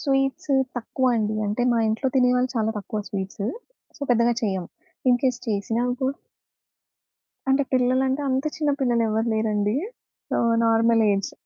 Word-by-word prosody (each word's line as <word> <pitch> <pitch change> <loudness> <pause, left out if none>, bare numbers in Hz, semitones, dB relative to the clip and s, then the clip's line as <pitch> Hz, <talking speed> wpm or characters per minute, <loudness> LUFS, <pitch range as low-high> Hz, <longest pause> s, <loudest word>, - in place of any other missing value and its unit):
Sweets 270 +2 +1 0.2
తక్కువ 260 +2 -2
అండి. 215 -1 0
అంటే, 210 +4 -1
మా 235 - +2
ఇంట్లో 220 +5 0
తినేవాళ్ళు 250 0 +3
చాలా 220 0 +1
తక్కువ 210 +2 -4
స్వీట్సు. 200 +1 -4 0.5
సో, 285 - -9
పెద్దగా 235 0 +3
చెయ్యము. 190 -5 -1 0.4
ఇన్‍కేస్ 250 0 +2
చేసినా 225 +3 -1 0.2
కూ 260 - +1 1.4
అంటే, 270 +1 +3
పిల్లలంటే 260 +2 +2
అంత 265 +2 0
చిన్న 300 -2 0
పిల్లలు 240 -3 +2
ఎవరు 220 +2 0
లేరండి. 210 -1 0 0.6
ఆ - - +2 0.3
నార్మల్ 225 0 +4
ఏజ్. 195 -1 -1
235 Hz, 135 wpm, -24 LUFS, 215-260 Hz, 1.4 s, నార్మల్